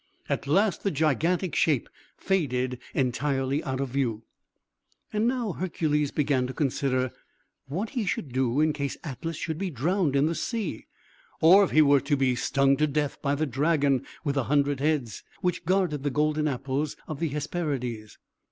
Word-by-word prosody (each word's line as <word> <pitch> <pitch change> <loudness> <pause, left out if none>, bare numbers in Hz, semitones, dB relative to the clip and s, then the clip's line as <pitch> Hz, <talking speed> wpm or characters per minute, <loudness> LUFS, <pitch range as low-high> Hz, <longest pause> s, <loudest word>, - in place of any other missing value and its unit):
At - - -2
last 195 +7 +2
the 200 - +1
gigantic 160 +3 +1
shape 145 -7 +2 0.3
faded 130 -9 0 0.2
entirely 135 +2 0
out 130 -2 -3
of 135 -1 -2
view. 120 -4 -1 0.9
And 215 +2 +2
now 245 -4 0
Hercules 155 -5 0
began 135 -4 +1
to 130 - -7
consider 130 -3 0 0.6
what 185 +11 -3
he 235 -7 -2
should 140 -7 -2
do 130 0 +1
in 155 0 +3
case 140 -2 -3
Atlas 155 +3 -5
should 160 -1 -3
be 195 -1 -1
drowned 160 - 0
in 140 +1 +4
the 165 - +1
sea, 225 +5 -3 0.5
or 185 +5 +7
if 195 - +1
he 155 - +5
were 140 -2 +5
to 145 - 0
be 130 -2 +2
stung 135 +2 +2
to 155 - +2
death 145 0 -2
by 140 0 +1
the 155 +2 0
dragon 140 -1 +1 0.2
with 145 -3 0
the 135 -3 0
hundred 145 -1 +1
heads, 140 -7 -1 0.2
which 180 -1 -1
guarded 180 -5 +1
the 145 - 0
golden 150 +2 +1
apples 135 +2 -2
of 155 -3 -5
the 165 - 0
Hesperides. 135 -7 -3
145 Hz, 170 wpm, -27 LUFS, 135-165 Hz, 0.9 s, or